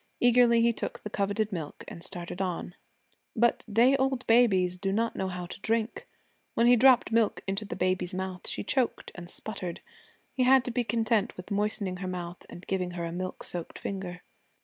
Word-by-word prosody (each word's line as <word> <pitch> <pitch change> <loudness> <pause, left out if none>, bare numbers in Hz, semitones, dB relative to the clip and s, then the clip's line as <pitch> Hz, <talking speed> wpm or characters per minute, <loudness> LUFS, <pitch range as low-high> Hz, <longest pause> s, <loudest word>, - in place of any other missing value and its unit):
Eagerly 240 -1 +5
he 235 0 +4
took - - -5
the 210 - -6
coveted 205 +1 0
milk 160 -6 -5
and 170 - -9
started 175 0 -6
on. 180 -1 -3 0.6
But 235 0 +2
day 240 +6 +5
old 265 -1 0
babies 190 -7 +4
do 195 0 -1
not 230 +3 0
know 190 - -1
how 180 -1 -4
to 175 - -9
drink. 225 +2 -1 0.5
When 230 - +3
he 245 +1 +7
dropped 255 -1 +5
milk 225 -2 +2
into 195 +2 -2
the - - -5
baby's 185 0 0
mouth 185 -1 -4
she - - -3
choked 250 +4 0
and 175 -1 -9
sputtered. 185 -5 -5 0.5
He 260 - -1
had 255 0 +5
to 245 - -2
be 245 +1 0
content 225 -1 0
with 180 +3 -9
moistening 205 -2 -1
her 185 0 -5
mouth 180 -1 -6
and 175 - -10
giving 185 -2 -1
her 170 - -2
a 165 - -4
milk 185 +2 -5
soaked 175 -2 -5
finger. 180 -2 -5
200 Hz, 195 wpm, -29 LUFS, 180-230 Hz, 0.6 s, he